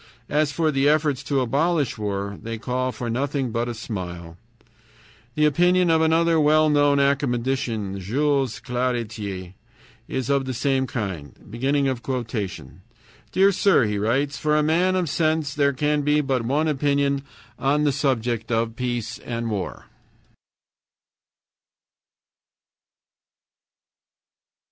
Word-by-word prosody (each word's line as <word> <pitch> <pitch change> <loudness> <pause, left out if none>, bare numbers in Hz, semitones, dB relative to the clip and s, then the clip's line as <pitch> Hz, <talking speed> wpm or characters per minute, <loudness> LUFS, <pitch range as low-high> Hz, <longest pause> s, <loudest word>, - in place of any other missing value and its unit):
As 150 0 +1
for 160 +1 +1
the 140 0 +2
efforts 150 -3 +1
to 140 -2 +1
abolish 145 +3 +1
war, 100 -2 -4
they 115 0 -5
call 130 +2 -2
for 125 - -6
nothing 130 +1 -1
but 120 +1 -1
a 120 - -4
smile. 90 -7 -6 1.0
The 150 - +3
opinion 175 +3 +3
of 160 0 +3
another 165 +1 +3
well 155 +1 +4
known 145 -1 +3
academician, 125 -7 0
Jules 135 +5 0
Claretie, 110 -7 -3 0.5
is 130 -2 -3
of 140 -1 +1
the 130 -1 -4
same 135 +1 0
kind. 95 - -5 0.2
"Dear 130 - -2
Sir 195 -6 +3
[he 105 -1 -1
writes]: 135 +7 0
For 150 0 +2
a 150 - +3
man 175 +5 +2
of 180 -2 0
sense 155 -1 0
there 140 -1 +2
can 150 +2 0
be 150 +1 +2
but 135 -3 0
one 145 +6 +1
opinion 140 -1 +1 0.4
on 145 +2 +2
the 145 - +3
subject 120 -5 -1
of 115 0 0
peace 120 -3 -3
and 115 -1 -4
war. 100 -3 -4
135 Hz, 120 wpm, -23 LUFS, 115-150 Hz, 1.0 s, well